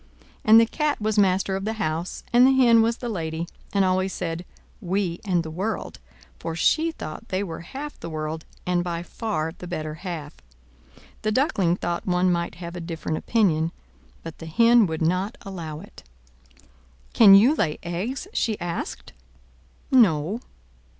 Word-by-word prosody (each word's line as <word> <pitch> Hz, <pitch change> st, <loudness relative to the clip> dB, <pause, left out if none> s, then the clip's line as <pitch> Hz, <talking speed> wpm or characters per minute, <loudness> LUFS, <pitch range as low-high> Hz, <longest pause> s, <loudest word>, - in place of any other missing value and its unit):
And 220 Hz, +1 st, +8 dB
the 230 Hz, -, +5 dB
Cat 300 Hz, +5 st, -1 dB
was 215 Hz, 0 st, +1 dB
master 190 Hz, 0 st, +2 dB
of 195 Hz, -, -3 dB
the 220 Hz, +2 st, -1 dB
house, 170 Hz, -5 st, -3 dB
and 245 Hz, +2 st, +7 dB
the -, -, +5 dB
Hen 240 Hz, -3 st, +6 dB
was 230 Hz, +1 st, +1 dB
the 245 Hz, -, -5 dB
lady, 165 Hz, -5 st, -3 dB, 0.2 s
and 200 Hz, -1 st, +2 dB
always 185 Hz, +1 st, +1 dB
said 170 Hz, -1 st, -4 dB, 0.4 s
"We 185 Hz, -2 st, -1 dB
and 180 Hz, -4 st, +1 dB
the 160 Hz, -, -7 dB
world!" 195 Hz, +6 st, -4 dB, 0.4 s
for 165 Hz, -, -4 dB
she 320 Hz, -, +2 dB
thought 155 Hz, -, -8 dB
they 190 Hz, +2 st, -1 dB
were 165 Hz, -4 st, -6 dB
half 275 Hz, -, -8 dB
the 170 Hz, -, -6 dB
world, 155 Hz, 0 st, -4 dB, 0.2 s
and 180 Hz, -1 st, +1 dB
by 170 Hz, -1 st, -3 dB
far 165 Hz, -5 st, -3 dB
the 180 Hz, -, -9 dB
better 155 Hz, -3 st, -4 dB
half. 155 Hz, -3 st, -6 dB, 0.9 s
The 215 Hz, -, 0 dB
Duckling 200 Hz, -, +2 dB
thought 175 Hz, 0 st, -3 dB
one 180 Hz, 0 st, +2 dB
might 170 Hz, -1 st, -1 dB
have 170 Hz, +1 st, -8 dB
a 175 Hz, -, -5 dB
different 165 Hz, -2 st, -4 dB
opinion, 170 Hz, -8 st, +1 dB, 0.5 s
but 165 Hz, -1 st, -9 dB
the 165 Hz, -, -8 dB
Hen 230 Hz, +5 st, +5 dB
would 160 Hz, 0 st, -3 dB
not 185 Hz, +9 st, 0 dB
allow 165 Hz, -6 st, -6 dB
it. -, -, -14 dB, 1.1 s
"Can 200 Hz, -4 st, +9 dB
you 230 Hz, +9 st, +6 dB
lay 155 Hz, -, 0 dB
eggs?" 195 Hz, -, -3 dB
she 220 Hz, -3 st, 0 dB
asked. 175 Hz, -1 st, -5 dB, 0.8 s
"No." 200 Hz, -, +4 dB
180 Hz, 165 wpm, -24 LUFS, 165-220 Hz, 1.1 s, Can